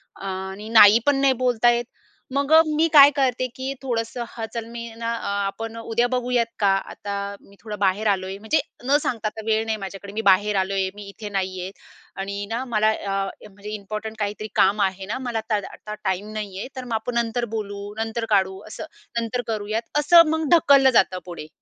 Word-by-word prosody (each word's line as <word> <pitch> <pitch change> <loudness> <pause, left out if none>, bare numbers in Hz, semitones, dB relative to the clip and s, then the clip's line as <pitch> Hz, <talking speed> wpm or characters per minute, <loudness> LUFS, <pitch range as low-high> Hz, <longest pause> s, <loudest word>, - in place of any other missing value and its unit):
अ, - - -10
आणि 190 +2 -5
नाही 220 -1 +8
पण 290 -1 +4
नाही 275 -1 +4
बोलता 240 -1 +4
येत 240 0 0 0.5
मग 280 +1 0
मी 310 +1 +2
काय 285 -2 +10
करते 255 -3 +1
की 260 +1 -4
थोडंसं 240 -2 -3
हं, 225 - -5
चल 230 -1 -4
मी 235 -1 -7
ना 230 0 -4 0.4
आपण 225 +3 -5
उद्या 230 +1 0
बघूयात 250 -1 0
का 205 - +3 0.2
आता 205 - -6 0.3
मी 200 - -20
थोडं 210 -3 -6
बाहेर 200 +2 +1
आलोय 190 -1 0
म्हणजे 220 +10 +1 0.3
न 280 +3 +4
सांगता 225 -3 -2
आता 220 +1 -6
वेळ 220 0 +1
नाही 220 -1 -1
माझ्याकडे 195 0 -8
मी 220 - -2
बाहेर 205 +2 +3
आलोय 190 0 0
मी 205 - -9
इथे 210 +1 -8
नाहीये 190 -2 -3 0.5
आणि 200 +1 -4
ना 230 +3 -2
मला 215 -3 +2
अ, 195 -2 -2 0.2
म्हणजे 205 +1 -11
इम्पॉर्टंट 215 +2 -6
काहीतरी 210 +1 -3
काम 200 +2 +3
आहे 190 -1 -1
ना 210 +6 -3
मला 235 -2 -2
आता 220 -1 -1
दा - - -8
आता 210 - -8
टाईम 190 +3 -2
नाहीये 205 -2 -5
तर 260 - -5
मग 240 - -5
आपण 225 +2 -2
नंतर 235 +1 0
बोलू, 205 -1 -5
नंतर 225 +1 -2
काढू, 190 -2 +2
असं 215 - -7 0.4
नंतर 235 +2 -2
करूयात 215 0 -2 0.2
असं 335 +2 +7
मग 320 0 0
ढकललं 280 -5 +6
जातं 185 -1 0
पुढे. 170 -4 -8
220 Hz, 195 wpm, -23 LUFS, 200-240 Hz, 0.5 s, काय